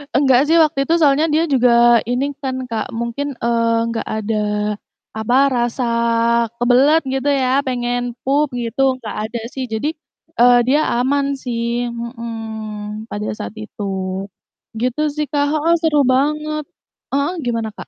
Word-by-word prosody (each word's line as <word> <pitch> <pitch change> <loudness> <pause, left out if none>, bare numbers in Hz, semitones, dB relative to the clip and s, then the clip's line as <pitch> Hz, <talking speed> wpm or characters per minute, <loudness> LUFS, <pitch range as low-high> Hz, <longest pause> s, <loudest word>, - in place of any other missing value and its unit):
Enggak 265 -2 +5
sih, 325 - +3
waktu 295 -3 0
itu 330 - +2
soalnya 295 +1 +4
dia 315 +2 +3
juga 240 -2 +5
ini 255 +4 0
kan 260 -1 -2
Kak, 225 -2 -2
mungkin, 235 +5 -3 0.2
eee, 230 -1 +2
enggak 230 -1 -3
ada, 220 0 -2 0.8
apa, 220 +3 0 0.2
rasa 240 +1 -1 0.8
kebelet 265 +6 +4
gitu 270 +1 -2
ya, 265 -1 +2
pengen 245 -1 -2
pup 285 +3 +2
gitu 245 +3 0
enggak 230 -5 -7
ada 235 +1 -5
sih. 265 -1 -4
Jadi, 220 +6 -2 0.5
eee, 245 0 +7
dia 285 +4 +4 0.2
aman 280 +2 +1
sih 240 -1 -2
mhm, 225 -2 -6
pada 210 +1 -4
saat - - -6
itu 215 -1 -8 1.0
gitu 250 +5 -1
sih, 300 +1 -2
Kak 290 -1 +1
heeh, 310 +2 +2
seru 315 -3 +2
banget 300 +4 0 0.5
heeh, 280 +4 +1
gimana, 230 -2 -2
Kak? - - -9
245 Hz, 145 wpm, -19 LUFS, 230-280 Hz, 1.0 s, eee